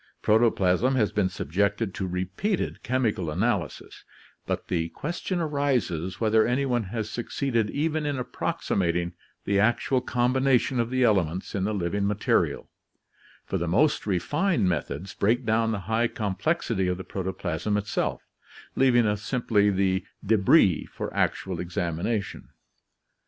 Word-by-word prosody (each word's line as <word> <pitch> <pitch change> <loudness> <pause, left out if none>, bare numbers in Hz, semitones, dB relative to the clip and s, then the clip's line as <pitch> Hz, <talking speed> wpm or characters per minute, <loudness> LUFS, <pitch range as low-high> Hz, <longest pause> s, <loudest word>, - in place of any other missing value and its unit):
Protoplasm 110 +1 +3
has 110 -5 +2
been 100 -3 +1
subjected 100 +5 -1
to 95 - -3
repeated 95 - -2
chemical 115 -9 0
analysis, 95 - -2 0.4
but - - -2
the 85 -2 -1
question 175 - -3
arises 130 - -1
whether 110 -1 +4
anyone 125 -2 0
has 110 +2 -4
succeeded 120 -1 -1
even 155 +2 -1
in 145 -2 -1
approximating 95 - -1 0.3
the 100 0 +2
actual 120 +4 +2
combination 130 +1 +1
of 115 0 0
the 130 0 +1
elements 95 -6 +1
in 95 -2 -1
the 110 - -1
living 100 +2 -1
material, 105 -1 0 0.8
for - - -2
the 85 - -2
most 120 - +2
refined 145 - +1
methods 90 +2 -3
break 115 +5 +1
down 110 +1 +2
the 105 -3 -2
high 115 +2 +1
com 105 -4 -3
plexity 110 - 0
of 90 - -1
the 95 - -6
protoplasm 95 +1 -2
itself, 105 0 -2 0.5
leaving 125 -3 +4
us 105 -1 0
simply 110 -3 +2
the 95 -1 +1 0.2
d6bris 100 - +4
for - - -6
actual 95 -3 -1
examination. 90 +4 -3
105 Hz, 135 wpm, -26 LUFS, 95-125 Hz, 0.8 s, whether